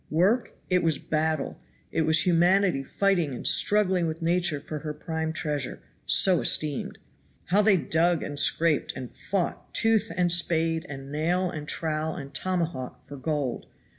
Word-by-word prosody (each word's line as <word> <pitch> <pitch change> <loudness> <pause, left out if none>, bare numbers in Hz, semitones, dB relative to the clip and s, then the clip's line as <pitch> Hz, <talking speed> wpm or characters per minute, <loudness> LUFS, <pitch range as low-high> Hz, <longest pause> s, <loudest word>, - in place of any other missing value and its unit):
Work? 190 +10 +1
It 180 -1 +2
was 160 -4 +1
battle; 155 -2 -2 0.3
it - - 0
was 160 0 +5
humanity 180 -3 +3
fighting 175 -4 0
and - - -8
struggling 190 -4 +3
with 160 0 -4
Nature 170 -3 +1
for 150 +1 -7
her 150 0 -6
prime 160 +1 -4
treasure 150 -5 -3 0.3
(so 185 -3 +5
esteemed). 150 -3 +1 0.5
How 200 +4 +4
they 205 -2 +4
dug 165 0 +1
and 145 -1 -3
scraped, 160 -1 +2
and 130 -2 -7
fought 190 -3 -4
tooth, 225 -2 +2
and 175 -1 +2
spade, 165 -1 +2
and 135 -1 -8
nail, 175 +4 0
and 150 -3 -7
trowel, 155 0 -2
and 140 -1 -9
tomahawk 170 -8 -3
for 145 0 -10
gold! 140 -2 -3
160 Hz, 155 wpm, -26 LUFS, 150-180 Hz, 0.5 s, was